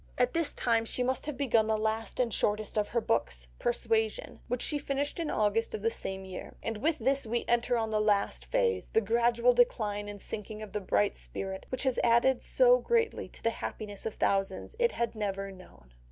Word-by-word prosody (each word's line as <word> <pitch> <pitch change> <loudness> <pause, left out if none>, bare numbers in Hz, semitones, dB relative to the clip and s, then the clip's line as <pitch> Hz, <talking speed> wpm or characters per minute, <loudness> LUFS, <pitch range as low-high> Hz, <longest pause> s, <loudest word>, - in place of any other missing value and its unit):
At 250 0 +2
this 330 -3 +1
time 230 -2 +1
she 250 +2 -2
must 260 +3 -1
have 300 - -4
begun 230 -6 +2
the 220 0 +2
last 220 +2 -2
and 240 -4 +1
shortest 210 +1 0
of 210 -1 +1
her 235 +1 0
books, - - -1
Persuasion, 225 -2 0
which 245 0 -1
she 295 - 0
finished 280 +3 -2
in 325 -2 -1
August 215 +2 +1
of 210 - -7
the 230 - +2
same 190 -3 -4
year. 185 -1 -8
And 225 -1 -2
with 310 +7 +1
this 270 +1 +1
we 235 +2 -1
enter 240 +1 +2
on 225 -1 -1
the 215 -1 +2
last 200 - +1
phase, 95 +9 +1
the - - +3
gradual 235 +2 +3
decline 210 -4 +1
and 205 0 -8
sinking 210 +2 -6
of 210 - -9
the 210 - -2
bright 200 +1 +1
spirit, 190 0 -6
which 255 - -2
had 260 -2 +1
added 240 +2 +4
so - - +5
greatly 460 -2 0
to - - -14
the 230 - +2
happiness 210 -2 -6
of 220 - -5
thousands 195 - 0
it 475 -1 +3
had 235 0 -1
never 195 -2 -3
known. 65 - -16
225 Hz, 210 wpm, -30 LUFS, 205-245 Hz, -, so